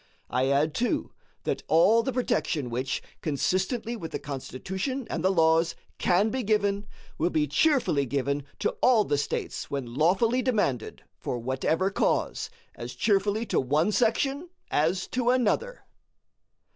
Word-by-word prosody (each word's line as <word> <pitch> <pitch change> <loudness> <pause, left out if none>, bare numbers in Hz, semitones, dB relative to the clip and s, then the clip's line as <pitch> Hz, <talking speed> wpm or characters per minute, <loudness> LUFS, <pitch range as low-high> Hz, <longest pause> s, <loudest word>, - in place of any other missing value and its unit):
I 130 +2 +1
add, 145 +3 +2
too, 290 +6 -1 0.3
that - - -2
all 195 +9 +5
the 265 - -2
protection 205 - -1
which, 130 +3 -2 0.2
consistently 185 - -1
with 165 -8 -6
the - - -2
Constitution 190 - -4
and 165 - -2
the 190 - +4
laws, 165 -2 +3 0.2
can 195 +4 +3
be 260 - -1
given, 205 -2 0 0.3
will 170 - +2
be 155 -3 +1
cheerfully 150 - +2
given 140 +2 -1 0.2
to - - +2
all 240 -4 +5
the 145 -6 0
States - - -3
when 130 -4 -4
lawfully 190 - +2
demanded, 205 - -1 0.2
for 125 - -3
whatever 130 +10 0
cause - - 0 0.2
as 120 +1 -8
cheerfully 205 - +1
to - - +1
one 150 +9 +1
section 270 - +1 0.2
as 165 +5 +1
to 250 -1 0
another. 255 - +1
185 Hz, 145 wpm, -27 LUFS, 145-230 Hz, 0.3 s, all